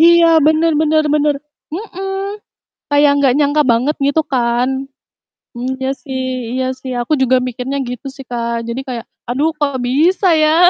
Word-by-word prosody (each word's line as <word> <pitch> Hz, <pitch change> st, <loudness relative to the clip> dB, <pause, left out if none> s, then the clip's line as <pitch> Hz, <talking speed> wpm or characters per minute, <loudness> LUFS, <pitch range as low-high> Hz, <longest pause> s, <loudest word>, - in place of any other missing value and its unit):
Iya, 340 Hz, +1 st, +7 dB, 0.2 s
bener 315 Hz, +1 st, +3 dB
bener 310 Hz, 0 st, +3 dB
bener, 295 Hz, -1 st, +2 dB, 0.4 s
mhm. 390 Hz, +2 st, -5 dB, 0.5 s
Kayak 290 Hz, 0 st, +5 dB
nggak 260 Hz, -2 st, +4 dB
nyangka 295 Hz, +1 st, +3 dB
banget 250 Hz, +6 st, +2 dB
gitu 285 Hz, +3 st, +2 dB
kan. 240 Hz, -1 st, +1 dB, 0.9 s
Mmm, 255 Hz, +2 st, -2 dB
iya 265 Hz, -, 0 dB
sih 260 Hz, -4 st, -4 dB
iya 260 Hz, 0 st, -1 dB
sih 260 Hz, 0 st, -7 dB
aku 240 Hz, +5 st, -1 dB
juga 260 Hz, 0 st, +4 dB
mikirnya 250 Hz, +2 st, -3 dB
gitu 250 Hz, +2 st, -6 dB
sih, 275 Hz, -, -10 dB
Kak, 235 Hz, -1 st, -2 dB
jadi 235 Hz, -, -3 dB
kayak, 235 Hz, -2 st, -5 dB, 0.2 s
"Aduh 280 Hz, +6 st, +1 dB
kok 280 Hz, -3 st, 0 dB
bisa 345 Hz, +9 st, +2 dB
ya?" 315 Hz, +3 st, +5 dB
280 Hz, 155 wpm, -17 LUFS, 250-315 Hz, 0.9 s, Iya